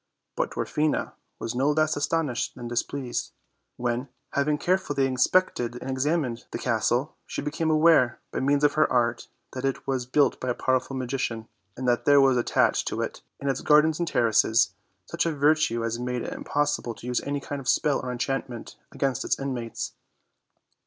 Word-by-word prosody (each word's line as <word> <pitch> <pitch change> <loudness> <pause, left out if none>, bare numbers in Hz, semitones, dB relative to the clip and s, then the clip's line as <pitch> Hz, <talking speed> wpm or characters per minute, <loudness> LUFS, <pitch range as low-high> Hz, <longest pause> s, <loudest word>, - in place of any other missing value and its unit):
3ut - - 0
Dwarfina 150 0 -1 0.2
was 115 - -4
no 130 +4 +1
less 155 +1 +2
astonished 145 -3 -1
than 120 -1 -7
displeased 120 +2 -3 0.4
when, 120 +2 -1 0.2
having 150 +1 +1
carefully 160 -6 +1
inspected 130 -2 +1
and 130 +2 -5
examined 130 -2 -1
the - - -4
cas 115 -3 0
tle, 130 +6 0
she - - -4
became 150 +3 -1
aware, 155 -6 +4
by - - -2
means 140 +2 +2
of 145 - +4
her 155 - +2
art, 120 -1 +1 0.3
that 130 - -5
it 135 -1 -2
was 130 -2 -2
built 140 +2 +2
by 130 - -3
a 120 - 0
powerful 130 +1 0
magician, 120 -3 -3 0.3
and 130 0 -3
that 120 -1 +1
there 145 0 +6
was 135 -2 +5
attached 120 - +2
to - - -2
it, - - -3 0.2
and 140 - -4
its 135 -2 0
gardens 150 +1 +4
and 170 - 0
terraces, 115 -3 +3 0.3
such - - -1
a 160 - -1
virtue 145 -5 +2
as 115 +1 -2
made 125 0 -2
it - - -4
impossible 145 -5 -1
to - - -12
use 125 0 0
any 145 0 -2
kind 140 0 -5
of 130 - -3
spell 145 -2 +2
or 125 - -4
enchantment 125 -1 -4
against 135 -4 -1
its - - 0
inmates. 125 -4 -4
135 Hz, 180 wpm, -26 LUFS, 120-145 Hz, 0.4 s, there